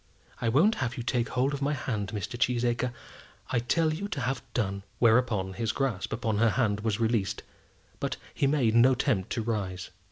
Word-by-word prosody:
I 115 Hz, -, +1 dB
won't 165 Hz, -, +4 dB
have 125 Hz, -1 st, -2 dB
you 120 Hz, -, -3 dB
take 120 Hz, 0 st, 0 dB
hold 130 Hz, +3 st, +1 dB
of 140 Hz, -, -4 dB
my 145 Hz, +2 st, +1 dB
hand, 115 Hz, -7 st, -2 dB
Mr. 105 Hz, +3 st, -4 dB
Cheesacre. 120 Hz, 0 st, +1 dB, 0.6 s
I 125 Hz, -, +2 dB
tell 155 Hz, +6 st, +1 dB
you 195 Hz, +6 st, -3 dB
to 150 Hz, -9 st, -4 dB
have 125 Hz, +1 st, -1 dB
done." 100 Hz, -4 st, -1 dB, 0.2 s
Whereupon 110 Hz, -5 st, +3 dB
his 110 Hz, +3 st, -1 dB
grasp 115 Hz, -7 st, -2 dB
upon 110 Hz, -2 st, -1 dB
her 115 Hz, 0 st, +5 dB
hand 105 Hz, -3 st, +1 dB
was 105 Hz, 0 st, -1 dB
released; 110 Hz, -4 st, 0 dB, 0.6 s
but -, -, -2 dB, 0.2 s
he 140 Hz, -, +1 dB
made 135 Hz, -6 st, +2 dB
no 120 Hz, +3 st, +6 dB
attempt 120 Hz, -7 st, 0 dB
to 115 Hz, -, -1 dB
rise. 95 Hz, -6 st, -3 dB
120 Hz, 190 wpm, -28 LUFS, 110-130 Hz, 0.6 s, no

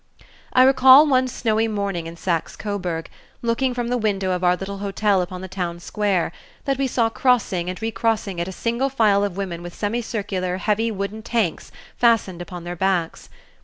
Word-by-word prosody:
I 255 Hz, -, +6 dB
recall 265 Hz, +2 st, +8 dB
one 260 Hz, -3 st, +3 dB
snowy 225 Hz, -2 st, 0 dB
morning 200 Hz, -6 st, -2 dB
in 165 Hz, -, -8 dB
Saxe 170 Hz, -2 st, -2 dB
Coburg, 180 Hz, -6 st, -4 dB, 0.4 s
looking 245 Hz, +2 st, 0 dB
from 240 Hz, -1 st, -2 dB
the 245 Hz, 0 st, 0 dB
window 195 Hz, -4 st, 0 dB
of 180 Hz, 0 st, -2 dB
our 180 Hz, 0 st, +4 dB
little 195 Hz, +2 st, -6 dB
hotel 200 Hz, -1 st, +1 dB
upon 180 Hz, 0 st, -5 dB
the 190 Hz, -, -6 dB
town 175 Hz, -2 st, -4 dB
square, 195 Hz, -2 st, -1 dB, 0.3 s
that 275 Hz, -1 st, 0 dB
we 275 Hz, -, +1 dB
saw 235 Hz, -2 st, +1 dB
crossing 210 Hz, -8 st, +1 dB
and 185 Hz, -, -5 dB
recrossing 220 Hz, -3 st, -1 dB
it 170 Hz, -, -2 dB
a -, -, -5 dB
single 235 Hz, +7 st, -1 dB
file 215 Hz, -6 st, +3 dB
of 200 Hz, -2 st, -3 dB
women 180 Hz, -4 st, -4 dB
with 175 Hz, 0 st, -9 dB
semicircular, 205 Hz, -4 st, -2 dB
heavy, 215 Hz, +4 st, 0 dB
wooden 205 Hz, +1 st, -4 dB
tanks 220 Hz, -7 st, -1 dB, 0.3 s
fastened 225 Hz, -7 st, +2 dB
upon 175 Hz, -1 st, -8 dB
their 175 Hz, +1 st, -5 dB
backs. 180 Hz, -2 st, -1 dB
200 Hz, 180 wpm, -22 LUFS, 180-230 Hz, 0.4 s, recall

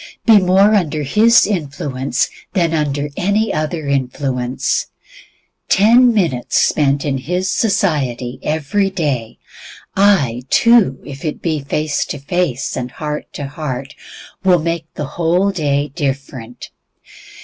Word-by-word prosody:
Be 225 Hz, -3 st, +7 dB
more 195 Hz, +3 st, +4 dB
under 155 Hz, -7 st, 0 dB
His 220 Hz, -, +4 dB
influence 140 Hz, -7 st, -2 dB, 0.3 s
than 170 Hz, -3 st, +1 dB
under 145 Hz, -2 st, -1 dB
any 205 Hz, +4 st, 0 dB
other 155 Hz, 0 st, -2 dB
influence. 130 Hz, -2 st, -1 dB, 0.8 s
Ten 235 Hz, +5 st, +5 dB
minutes 165 Hz, -, 0 dB
spent 140 Hz, -1 st, +2 dB
in 135 Hz, -2 st, -1 dB
His 180 Hz, +7 st, -2 dB
society 150 Hz, -, 0 dB
every 160 Hz, +6 st, 0 dB
day, 145 Hz, -11 st, -3 dB, 0.6 s
ay, 180 Hz, -, +3 dB
two 230 Hz, -, +4 dB
minutes -, -, -20 dB
if 140 Hz, -1 st, -9 dB
it 155 Hz, -, -3 dB
be 160 Hz, -3 st, -1 dB
face 150 Hz, +2 st, -1 dB
to -, -, -4 dB
face, 140 Hz, -2 st, -2 dB
and 125 Hz, -1 st, -4 dB
heart 150 Hz, +3 st, -5 dB
to 145 Hz, -, -5 dB
heart, 135 Hz, -2 st, -5 dB, 0.5 s
will 185 Hz, -2 st, +5 dB
make 165 Hz, 0 st, -3 dB
the 150 Hz, -, -3 dB
whole 175 Hz, +7 st, +1 dB
day 145 Hz, -5 st, -1 dB
different. 135 Hz, -5 st, -5 dB
150 Hz, 125 wpm, -17 LUFS, 135-185 Hz, 0.8 s, Be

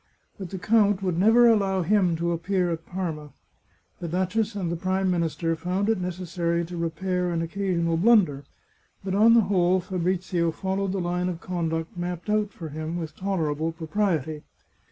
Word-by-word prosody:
But 190 Hz, -3 st, -6 dB
the 190 Hz, -, -5 dB
count 205 Hz, 0 st, +2 dB
would 180 Hz, -3 st, 0 dB
never 225 Hz, +5 st, +6 dB
allow 195 Hz, -5 st, +3 dB
him 185 Hz, -2 st, +2 dB
to 170 Hz, +1 st, -1 dB
appear 175 Hz, +1 st, 0 dB
at 165 Hz, 0 st, -5 dB
Parma. 160 Hz, -6 st, -5 dB, 0.7 s
The 170 Hz, -, -4 dB
duchess 190 Hz, +6 st, -1 dB
and 180 Hz, -4 st, -2 dB
the -, -, -1 dB
Prime 185 Hz, +2 st, 0 dB
Minister 165 Hz, -1 st, 0 dB
found 180 Hz, +5 st, -1 dB
it 220 Hz, -5 st, +1 dB
necessary 170 Hz, -1 st, -2 dB
to 175 Hz, +2 st, -8 dB
re 170 Hz, -1 st, -1 dB
pair 180 Hz, +1 st, -2 dB
an 165 Hz, -1 st, -1 dB
occasional 170 Hz, -2 st, -1 dB
blunder, 175 Hz, -8 st, +4 dB, 0.6 s
but 190 Hz, -1 st, -3 dB
on 220 Hz, +4 st, +6 dB
the 230 Hz, -, +7 dB
whole 185 Hz, -2 st, +2 dB
Fabrizio 180 Hz, -1 st, -1 dB
fol 190 Hz, +4 st, -3 dB
lowed 195 Hz, -1 st, -1 dB
the 195 Hz, -, -1 dB
line 180 Hz, +1 st, -1 dB
of 170 Hz, -2 st, -5 dB
conduct 165 Hz, -2 st, -3 dB
mapped 175 Hz, +2 st, -4 dB
out 210 Hz, -1 st, +1 dB
for 165 Hz, -5 st, -8 dB
him 155 Hz, +3 st, -4 dB
with 160 Hz, -2 st, -6 dB
toler 185 Hz, -6 st, -1 dB
able 160 Hz, +3 st, -2 dB
propriety. 160 Hz, -3 st, -1 dB
180 Hz, 180 wpm, -25 LUFS, 165-195 Hz, 0.7 s, the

